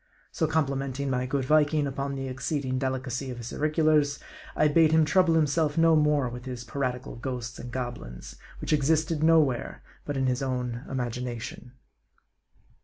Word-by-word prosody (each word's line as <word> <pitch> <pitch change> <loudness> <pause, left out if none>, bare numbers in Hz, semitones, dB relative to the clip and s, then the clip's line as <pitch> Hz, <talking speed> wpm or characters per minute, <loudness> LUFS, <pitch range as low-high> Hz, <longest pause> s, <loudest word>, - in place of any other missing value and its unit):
So 160 - 0
com 160 -1 +2
plimenting 135 0 -3
my 125 0 -1
good 135 0 -1
Viking 150 +1 +3
upon 140 0 -3
the 135 0 -4
exceeding 130 0 -2
delicacy 130 0 -2
of 125 - -6
his 120 0 -7
auriculars, 155 -1 +2 0.4
I 150 - +4
bade 155 +1 +4
him 160 -1 +5
trouble 170 +2 +3
himself 155 0 +1
no 165 0 +5
more 150 -3 +3
with 125 +1 -7
his 125 -2 -5
piratical 125 +1 -3
ghosts 125 -1 -5
and 120 - -7
goblins, 120 - -6 0.2
which - - -1
existed 155 +2 +1
nowhere 155 -6 +2 0.2
but 145 - -3
in 135 - +1
his 130 +1 0
own 125 -2 -2
imagination. 125 -1 -4
135 Hz, 160 wpm, -27 LUFS, 125-150 Hz, 0.4 s, him